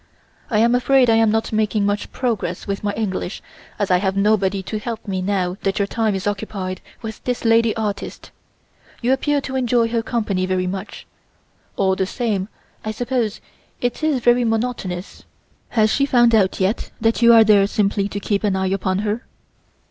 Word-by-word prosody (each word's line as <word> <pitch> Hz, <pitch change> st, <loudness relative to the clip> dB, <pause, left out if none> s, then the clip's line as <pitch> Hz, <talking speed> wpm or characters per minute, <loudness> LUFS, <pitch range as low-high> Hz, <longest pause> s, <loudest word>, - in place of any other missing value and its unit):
I 215 Hz, -, +1 dB
am 230 Hz, +2 st, +4 dB
afraid 250 Hz, 0 st, +4 dB
I 225 Hz, -, +4 dB
am 225 Hz, -1 st, +4 dB
not 220 Hz, +1 st, 0 dB
making 215 Hz, -1 st, +1 dB
much 205 Hz, 0 st, -2 dB
progress 220 Hz, -8 st, -2 dB
with 200 Hz, 0 st, -4 dB
my 205 Hz, -, 0 dB
English 200 Hz, -3 st, -3 dB, 0.4 s
as 205 Hz, -2 st, -1 dB
I 180 Hz, -, +5 dB
have 190 Hz, +1 st, -1 dB
nobody 200 Hz, -1 st, +2 dB
to 215 Hz, +3 st, -4 dB
help 225 Hz, 0 st, -6 dB
me 190 Hz, -2 st, -2 dB
now 185 Hz, -1 st, -1 dB
that 195 Hz, 0 st, -1 dB
your 200 Hz, -, +2 dB
time 215 Hz, 0 st, 0 dB
is 190 Hz, -, -4 dB
occupied 195 Hz, -3 st, -3 dB, 0.2 s
with 220 Hz, -2 st, -7 dB
this 245 Hz, -1 st, -3 dB
lady 225 Hz, -1 st, +4 dB
artist. 210 Hz, -3 st, -4 dB, 0.7 s
You 250 Hz, +2 st, +3 dB
appear 285 Hz, +2 st, +1 dB
to 265 Hz, -1 st, -5 dB
enjoy 240 Hz, -2 st, +2 dB
her 230 Hz, 0 st, 0 dB
company 210 Hz, -6 st, -1 dB
very 185 Hz, 0 st, 0 dB
much. 190 Hz, +2 st, -6 dB, 0.7 s
All 190 Hz, -1 st, +2 dB
the 190 Hz, 0 st, -1 dB
same 205 Hz, -4 st, -2 dB, 0.4 s
I 215 Hz, -, -3 dB
suppose 235 Hz, -1 st, -2 dB, 0.4 s
it 245 Hz, +4 st, -2 dB
is 305 Hz, -5 st, +1 dB
very 240 Hz, 0 st, +4 dB
monotonous. 225 Hz, -5 st, -3 dB, 0.5 s
Has 220 Hz, -2 st, +2 dB
she 275 Hz, -, +2 dB
found 240 Hz, -3 st, +4 dB
out 195 Hz, -4 st, +3 dB
yet 190 Hz, +4 st, 0 dB
that 225 Hz, +1 st, +1 dB
you 235 Hz, 0 st, +7 dB
are 225 Hz, -1 st, +8 dB
there 205 Hz, -2 st, +5 dB
simply 200 Hz, -1 st, 0 dB
to 205 Hz, -, -4 dB
keep 200 Hz, +1 st, -1 dB
an 200 Hz, -2 st, +1 dB
eye 190 Hz, 0 st, 0 dB
upon 190 Hz, -1 st, -1 dB
her?" 215 Hz, +3 st, -2 dB
215 Hz, 185 wpm, -20 LUFS, 195-235 Hz, 0.7 s, are